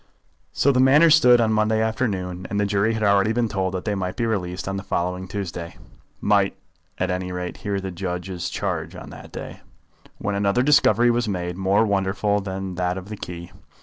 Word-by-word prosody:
So 140 - +3
the 125 - +1
matter 145 +5 +6
stood 125 -6 +6
on 115 -1 +2
the - - +2
Monday 110 0 +2
afternoon, 100 -5 -2
and 105 - -1
the 105 - +2
jury 100 +3 +1
had 110 - -2
already 100 +1 +3
been 120 0 +1
told 95 -3 -2
that 90 - -4
they 105 - 0
might 95 -2 -3
be 120 - -1
released 95 -5 -2
on 95 - -2
the - - -4
following 90 -1 -2
Tuesday, 90 -4 -5 0.4
might - - +2 0.4
at 90 0 -1
any 90 0 -3
rate 90 0 -5
hear 100 0 -2
the 95 -1 -5
judge's 90 0 -4
charge - - -3
on - - -9
that - - -11
day, - - -8 0.6
when 100 - -2
another 100 +4 +1
discovery 120 -5 +4
was 120 0 0
made 90 -3 -3
more 95 +4 +2
wonderful 100 0 0
than 95 -1 -5
that 90 +1 -1
of 95 +1 -8
the 105 - -5
key. 85 -2 -8
100 Hz, 205 wpm, -23 LUFS, 90-110 Hz, 0.6 s, matter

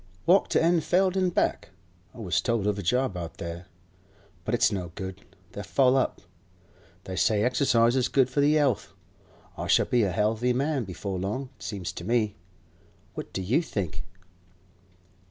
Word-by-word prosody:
'Walked 190 +3 +4
to - - +4
Enfleld 175 +3 +2
an' 185 -1 +2
back. 175 - 0 0.5
I - - -13
was 95 -8 0
told 115 -4 0
of 105 -1 0
a - - -2
job 125 +4 0
out 85 -2 -6
there; 85 +2 -7 0.8
but 120 - 0
it's 120 - +3
no 90 -4 -4
good; 95 0 -7 0.3
they're 100 - -6
full 130 +5 +3
up. 130 - 0 0.8
They 95 - -6
say 105 +2 +2
exercise 120 -1 +3
is 130 -2 +2
good 130 -1 +3
for 130 +3 0
the 150 +2 +4
'ealth. 140 -7 0 0.7
I - - -3
shall - - +4
be 125 - +2
a 100 -4 +1
'ealthy 110 +6 +1
man 135 -1 0
before 95 0 -5
long, 110 +8 -3
it - - -28
seems 95 -5 -4
to - - -8
me. 110 0 +1 0.8
What - - -7
do 95 - -3
you 120 - +2
think? 100 - -4
115 Hz, 175 wpm, -27 LUFS, 95-135 Hz, 0.8 s, Walked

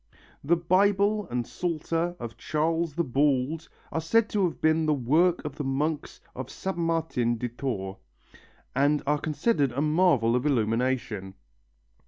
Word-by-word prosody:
The 165 +5 +3
Bible 200 +4 +2
and 120 -1 -2
Psalter 170 +1 -2
of 115 -2 -6
Charles 160 0 -1
the 170 - +1
Bald 140 +2 0 0.2
are 160 - -1
said 220 +7 +2
to 205 -2 +1
have 170 - -3
been 160 0 +2
the 150 - +3
work 160 +8 +2
of 150 -1 -5
the 150 - -3
monks 145 +3 -2
of 130 -1 -6
Saint 190 -2 -4
Martin 160 -8 0
de 120 +2 -3
Tours, 105 -6 -4 0.8
and 145 +2 +2
are 145 +1 +1
considered 150 - +1
a 140 - -1
marvel 150 -8 +3
of 125 - 0
illumination. 115 -6 0
150 Hz, 150 wpm, -27 LUFS, 125-170 Hz, 0.8 s, The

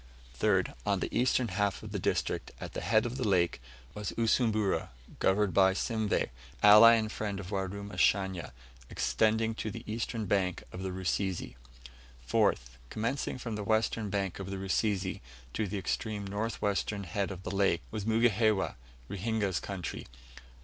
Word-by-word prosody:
3rd. - - +2
On - - +1
the - - -4
eastern 125 -1 +2
half 100 0 -1
of - - -8
the - - -2
district, - - -1
at - - -7
the - - -4
head 110 +6 +3
of 120 +2 -3
the 130 - -2
lake, 85 -8 +2 0.3
was 105 -1 -4
Usumbura, 110 -3 +1 0.3
governed 95 -1 +2
by 95 0 +5
Simveh, 110 - 0 0.3
ally 105 +3 +10
and 110 -1 -1
friend 105 -2 -3
of 95 0 -7
Warumashanya, 95 -2 0 0.4
extending 110 +1 +1
to 110 - -4
the 100 - -7
eastern 115 0 -3
bank 95 -3 0
of 90 - -7
the 95 - -3
Rusizi. 95 -4 -2 0.7
4th. 60 +1 +1
Commencing 120 +5 -2
from 120 -2 -5
the 105 -1 -3
western 110 0 +1
bank 100 -2 -2
of 95 0 -5
the 100 - -4
Rusizi, 95 0 -1 0.3
to 110 - -1
the 100 - -3
extreme 105 +1 -2
north 105 +3 -3
western 100 0 0
head 95 +3 -2
of 95 -1 -7
the 95 - -4
lake, 95 -4 +2
was 110 -2 -3
Mugihewa 110 -3 +3 0.3
Ruhinga's 100 -2 -1
country. 95 -4 -5
100 Hz, 155 wpm, -31 LUFS, 95-110 Hz, 0.7 s, ally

